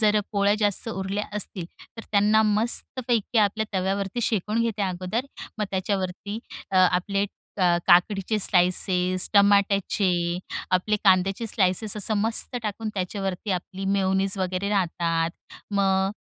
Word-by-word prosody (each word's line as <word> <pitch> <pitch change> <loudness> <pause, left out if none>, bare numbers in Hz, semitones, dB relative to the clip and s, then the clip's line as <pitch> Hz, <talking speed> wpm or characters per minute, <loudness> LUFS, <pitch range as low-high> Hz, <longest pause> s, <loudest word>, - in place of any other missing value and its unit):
जर 215 -1 +3
अ, - - +3
पोळ्या 200 0 +2
जास्त 205 +1 +1
उरल्या 195 0 -3
असतील 190 -3 -2 0.3
तर 225 - -7
त्यांना 210 +1 +4
मस्तपैकी 230 +2 +1
आपल्या 215 +1 +1
तव्यावरती 195 +4 -2
शेकून 215 0 0
घेते 220 -3 -2
अगोदर 185 +6 -2 0.3
मग 210 - 0
त्याच्यावरती 190 +1 -3 0.3
अ, 190 - 0
आपले 185 +2 +2
क 200 - -14 0.3
काकडीचे 195 +4 +3
स्लाइसेस 180 -1 +2
टमाट्याचे 200 -1 +3 0.6
आपले 185 +4 +1
कांद्याचे 195 +3 +3
स्लाइसेस 205 0 +1
असं 210 +1 0
मस्त 225 +4 +1
टाकून 215 +1 -4
त्याच्यावरती 195 +1 -3
आपली 185 +1 -4
मेयोनीज 195 0 0
वगैरे 185 +1 -2
राहतात 170 -4 0 0.4
मग 195 -1 +2
200 Hz, 125 wpm, -24 LUFS, 185-210 Hz, 0.6 s, त्यांना